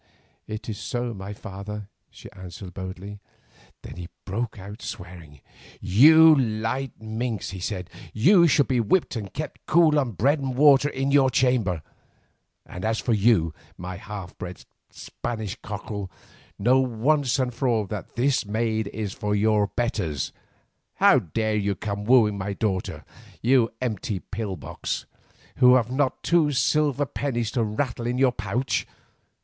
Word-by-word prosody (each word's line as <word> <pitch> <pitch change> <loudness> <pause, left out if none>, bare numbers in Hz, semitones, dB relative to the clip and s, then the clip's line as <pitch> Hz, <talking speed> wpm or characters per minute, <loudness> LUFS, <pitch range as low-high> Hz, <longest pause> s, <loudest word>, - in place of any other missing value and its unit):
"It 110 0 -6
is 110 -3 -5
so, 120 -1 -3
my 100 0 -7
father," 105 0 -7 0.2
she - - -13
answered 95 0 -10
boldly. 95 +2 -7 0.6
Then - - -9
he 90 -1 -6 0.2
broke 115 +4 -3
out 100 +4 -9
swearing. 85 -6 -9 0.4
"You 160 - +7
light 120 +1 -2
minx," 110 -1 -3
he 95 - -7
said, 90 -1 -4 0.2
"you 170 - +5
shall 140 -2 +4
be 130 -2 +1
whipped 130 - +1
and 105 -4 -5
kept 150 0 -6
cool 155 -2 +5
on 125 -5 -1
bread 140 - +2
and 135 -2 -3
water 145 +1 +6
in 135 0 -1
your 140 -2 +5
chamber. 115 - +1 0.8
And 90 - -8
for 120 - 0
you, 100 -7 +3 0.2
my 90 +1 -6
half 100 -2 -8
bred 90 0 -8 0.2
Spanish 110 -3 -5
cockerel, 100 -1 -6 0.5
know 125 +6 +4
once 130 +2 +1
and 130 -2 -1
for 125 +3 -1
all 115 -4 +2
that 105 +1 -7
this 130 +2 +2
maid 110 0 -1
is 105 -3 -4
for 105 0 -2
your 105 0 +3
betters. 90 - -2 0.6
How - - +5
dare 110 +5 -2
you 100 -1 0
come 100 0 -4
wooing 110 -4 +4
my 100 +1 -3
daughter, 95 -3 -2 0.4
you 120 -1 +4
empty 110 -4 -2
pill 100 +1 -5
box, - - -5 0.5
who 125 -1 +7
have 120 -1 +1
not 135 0 0
two 165 -4 +3
silver 145 +2 +2
pennies 120 -5 -2
to 120 -3 0
rattle 120 +2 -2
in 125 +1 -1
your 130 -1 +4
pouch! 105 0 -2
110 Hz, 150 wpm, -25 LUFS, 100-130 Hz, 0.8 s, You